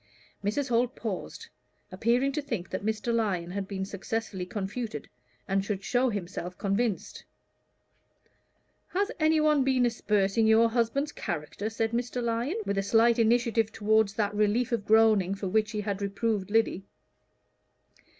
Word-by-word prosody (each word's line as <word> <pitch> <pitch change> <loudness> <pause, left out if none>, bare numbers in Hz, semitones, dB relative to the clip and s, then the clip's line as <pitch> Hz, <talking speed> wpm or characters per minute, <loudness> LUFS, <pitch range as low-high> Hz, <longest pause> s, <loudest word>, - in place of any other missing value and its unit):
Mrs. 245 +7 -1
Holt 245 +2 +1
paused, 225 - -5 0.4
appearing 235 +8 +1
to 300 +2 -2
think 230 -10 -5
that 185 - -3
Mr. 220 +2 -1
Lyon 190 -7 0
had 195 0 -4
been 190 -1 -3
successfully 200 -1 -4
confuted, 205 - -4 0.4
and 195 0 +1
should 195 -1 -3
show 250 +4 +2
himself 180 -3 -5
convinced. 200 +1 -2 1.6
"Has 400 +4 -1
any 315 0 +3
one 305 -2 +3
been 260 -2 +2
aspersing 210 -2 +1
your 225 +1 +5
husband's 240 +5 0
character?" 175 - -4
said 225 0 -1
Mr. 245 +1 -2
Lyon, 240 - -1
with 200 - 0
a - - +2
slight 230 +3 +3
initiative 230 -1 +2
toward 220 0 +3
that 205 -2 0
relief 215 +4 +1
of 225 -4 -2
groaning 215 -4 +4
for 195 0 -4
which 215 +3 +1
he 215 -1 -3
had 200 -1 -3
reproved 200 0 -1
Lyddy. 220 -3 +1
220 Hz, 145 wpm, -28 LUFS, 200-235 Hz, 1.6 s, your